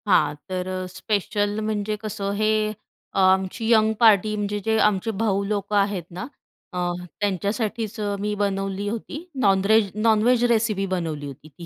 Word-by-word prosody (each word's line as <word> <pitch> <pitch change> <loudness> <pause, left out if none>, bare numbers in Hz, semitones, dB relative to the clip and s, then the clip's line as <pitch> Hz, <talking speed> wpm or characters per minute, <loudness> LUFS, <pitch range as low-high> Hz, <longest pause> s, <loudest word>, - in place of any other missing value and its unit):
हां, 150 -6 +4 0.2
तर 185 0 -3
अ, 185 0 -3
स्पेशल 205 +2 -1
म्हणजे 215 0 -1
कसं? 200 -2 -3
हे 215 +1 +2 0.6
अ, - - 0
आमची 190 +4 +2
अ, - - +7
यंग 220 0 +2
पार्टी 215 -2 +5
म्हणजे 205 0 -2
जे 220 0 +2
आमचे 205 +2 -2
भाऊ 200 -3 +1
लोक 205 0 -2
आहेत 200 -3 +1
ना, 185 - -4 0.5
अ, - - -4 0.4
त्यांच्यासाठीच 210 +3 -2 0.2
मी 210 +1 -1
बनवली 195 0 -2
होती 235 +9 -6 0.2
नॉनरेज 200 +1 +4
नॉनव्हेज 225 +3 +3
रेसिपी 215 -3 +1
बनवली 160 -5 -3
होती 140 +2 -11
ती. 170 +4 -12
205 Hz, 155 wpm, -24 LUFS, 190-215 Hz, 0.6 s, अ